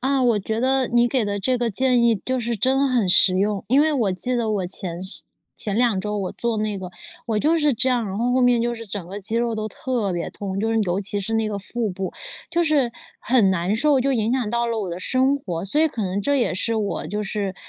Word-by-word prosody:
啊， 270 +1 +1
我 235 -4 +3
觉 220 +3 -3
得 260 +1 +1
你 240 0 +3
给 255 0 +1
的 205 -1 -2
这 250 +6 0
个 240 -1 -1
建 250 +3 +2
议， 235 -1 +4
就 260 0 -1
是 235 -1 -2
真 270 +5 +2
很 245 -6 +1
实 185 +1 +6
用。 200 0 0
因 265 - +3
为 315 0 +2
我 220 -9 0
记 250 +7 0
得 235 -3 0
我 200 -4 -1
前 175 -1 -3
是 190 +2 +2 0.3
前 205 -1 0
2 230 -5 +2
周 210 +2 -3
我 195 -3 -3
做 235 -2 -2
那 210 -1 -2
个， 185 -2 -7 0.4
我 220 -2 0
就 315 +8 +2
是 295 -4 +2
这 260 +4 +3
样， 240 -4 0
然 190 - -5
后 240 +3 0
后 255 - +2
面 245 -2 +3
就 240 0 -1
是 230 -1 -9
整 195 -3 -5
个 200 +3 -7
肌 220 +4 0
肉 235 -1 0
都 215 0 -3
特 220 -4 -2
别 170 -1 -4
痛， 195 -1 -5
就 225 +2 -1
是 225 - +1
尤 175 +2 0
其 205 +1 -1
是 220 +3 -3
那 225 0 +1
个 210 -1 -3
腹 220 +2 -3
部， 190 0 -4 0.4
就 340 +1 +1
是 290 -6 +2 0.3
很 235 -6 +3
难 185 +3 -1
受， 285 +2 +3
就 275 +2 +1
影 225 0 0
响 255 -5 -1
到 235 +1 0
了 230 -1 -2
我 195 - -4
的 170 - -5
生 260 +7 +2
活。 175 -10 -5
所 200 +9 -1
以 320 - +5
可 240 -7 -4
能 190 +1 -2
这 285 +8 0
也 245 - +1
是 225 +5 +1
我 210 -2 -2
就 210 0 -3
是， 200 -2 -3
225 Hz, 280 characters per minute, -22 LUFS, 200-250 Hz, 0.4 s, 实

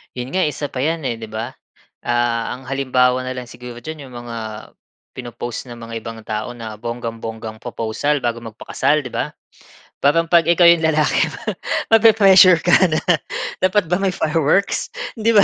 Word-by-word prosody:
'Yon 125 +1 -5
nga, 185 - +3
isa 150 -1 -2
pa 130 -1 -4
'yan 160 -3 -1
eh, 115 - -2
'di 110 -1 -9
ba? 115 +4 -5 0.5
Ah, 120 -1 0
ang 130 - -13
halimbawa 130 -1 +2
na 130 - -4
lang 125 - -5
siguro 120 -1 -10
diyan 155 -3 -7
'yong 125 - -13
mga, 115 -1 -6 0.8
pino-post 120 0 -6
ng 120 - -8
mga 115 0 -9
ibang 115 -1 -9
tao 110 +3 -4
na 110 -2 -7
bonggang-bonggang 115 -1 -6
proposal 120 +5 -1
bago 120 -3 -2
magpakasal, 130 +6 -1
'di 125 - -8
ba? - - -1 0.7
Parang 150 +4 +3
'pag 170 -2 +5
ikaw 170 +1 +4
'yong 170 0 +7
lalaki 155 -3 +2 0.7
mape-pressure 195 -6 +7
ka 175 - +2 0.2
na, 155 -1 0 0.6
"Dapat 185 -2 +1
ba 180 - +2
may 195 -2 0
fireworks?" 160 +6 +1 0.3
'Di 225 +1 +2
ba? 205 - +8
130 Hz, 165 wpm, -20 LUFS, 115-165 Hz, 0.8 s, ba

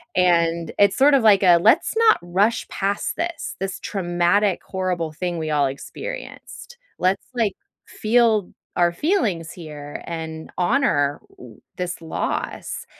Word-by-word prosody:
And 170 -2 +2
it's 200 -1 +4
sort 280 +2 +6
of 260 - +2
like 205 -3 +6
a 180 -3 +6
"Let's 175 - +3
not 455 -1 +5
rush 195 +6 0
past 200 +1 -2
this, 340 -2 -4
this 195 -1 -4
traumatic, 180 +1 +1
horrible 180 -4 -2
thing 175 +1 -3
we 155 -1 -3
all 145 -2 +2
experienced. 485 - -8 0.2
Let's, 185 +2 +1
like, 225 -5 0 0.3
feel 220 -3 +2 0.3
our 175 -1 +3
feelings 195 - -1
here 150 -4 -9
and 160 -1 -6
honor 175 - +1
w 120 -4 -15 0.2
this 180 -2 -4
loss." 165 - -4
180 Hz, 135 wpm, -22 LUFS, 165-215 Hz, 0.3 s, sort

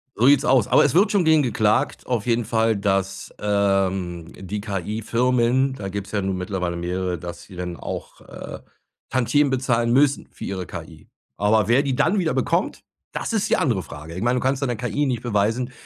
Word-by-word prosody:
So 120 - +3
sieht's 140 -1 +5
aus. 130 -6 +4
Aber - - +5
es 140 - +1
wird 200 +4 +4
schon 195 -4 +2
gegen 160 -1 +5
geklagt 110 -4 +1
auf 120 -3 -2
jeden 120 -1 +1
Fall, 115 0 +2
dass, 95 -1 -1
ähm, 95 -4 0
die 100 +2 -5
KI-Firmen 115 +6 0
da 100 -6 -6
gibt's 100 0 -5
ja 100 -2 0
nun 95 -1 -2
mittlerweile 90 -2 -3
mehrere, 90 +1 -2
dass 85 +1 -8
sie 95 - -14
dann 90 -1 -5
auch, - - -7
äh, - - -9 0.5
Tantiemen 135 +3 +2
bezahlen 120 -3 +1
müssen 140 +2 +3
für - - -11
ihre 95 -2 -4
KI. - - -10 0.3
Aber 105 0 +3
wer 120 +4 +4
die 140 -3 -1
dann 170 +9 +2
wieder 165 -4 0
bekommt, - - 0 0.3
das - - -4
ist 215 -1 0
die - - +3
andere 115 -11 +1
Frage. 75 +2 -10
Ich 90 - -5
meine, 120 +2 +2
du - - -5
kannst 135 +1 +1
deine 125 -3 0
KI 125 +5 -1
nicht 125 -3 -2
beweisen, 115 +3 0
110 Hz, 195 wpm, -23 LUFS, 95-130 Hz, 0.5 s, sieht's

